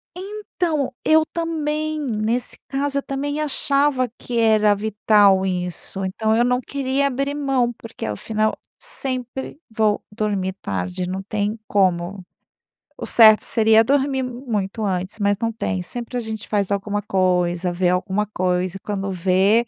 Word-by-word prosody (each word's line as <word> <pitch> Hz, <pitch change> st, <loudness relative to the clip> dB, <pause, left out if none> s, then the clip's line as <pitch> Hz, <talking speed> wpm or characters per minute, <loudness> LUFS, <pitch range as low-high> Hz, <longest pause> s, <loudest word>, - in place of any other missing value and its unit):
Então, 360 Hz, -8 st, -2 dB
eu 315 Hz, 0 st, +5 dB
também. 310 Hz, -2 st, -2 dB
Nesse 235 Hz, -2 st, -1 dB
caso, 280 Hz, +1 st, -1 dB
eu -, -, -7 dB
também 285 Hz, +2 st, -3 dB
achava 280 Hz, -3 st, +1 dB
que 240 Hz, -1 st, -4 dB
era 215 Hz, -2 st, +4 dB
vital 205 Hz, -2 st, +3 dB
isso. 180 Hz, +1 st, -3 dB
Então 220 Hz, +4 st, 0 dB
eu 240 Hz, -, +4 dB
não 250 Hz, 0 st, +2 dB
queria 275 Hz, +1 st, -1 dB
abrir 275 Hz, +2 st, -1 dB
mão, 270 Hz, -4 st, +1 dB
porque 230 Hz, -, -8 dB
ao 105 Hz, -1 st, -3 dB
final 215 Hz, 0 st, -1 dB, 0.2 s
sempre 265 Hz, -, -4 dB
vou 215 Hz, -1 st, +1 dB
dormir 205 Hz, -3 st, -1 dB
tarde, 90 Hz, -, -3 dB
não 190 Hz, +1 st, -3 dB
tem 210 Hz, +2 st, -2 dB
como. 185 Hz, -1 st, +1 dB, 0.8 s
O -, -, -4 dB
certo 220 Hz, -2 st, +7 dB
seria 225 Hz, 0 st, +4 dB
dormir 270 Hz, 0 st, +1 dB
muito 225 Hz, -5 st, -3 dB
antes, 190 Hz, +2 st, -2 dB
mas 200 Hz, 0 st, +2 dB
não 230 Hz, 0 st, 0 dB
tem. 200 Hz, -4 st, -2 dB
Sempre 240 Hz, +6 st, -6 dB
a -, -, +1 dB
gente 220 Hz, -1 st, -6 dB
faz 205 Hz, -2 st, 0 dB
alguma 200 Hz, +1 st, -1 dB
coisa, 180 Hz, -2 st, +1 dB
vê 175 Hz, 0 st, +1 dB
alguma 190 Hz, +3 st, 0 dB
coisa 185 Hz, -1 st, -1 dB
e -, -, -8 dB
quando 195 Hz, -2 st, -3 dB
vê: 190 Hz, +6 st, +3 dB
220 Hz, 150 wpm, -22 LUFS, 195-265 Hz, 0.8 s, certo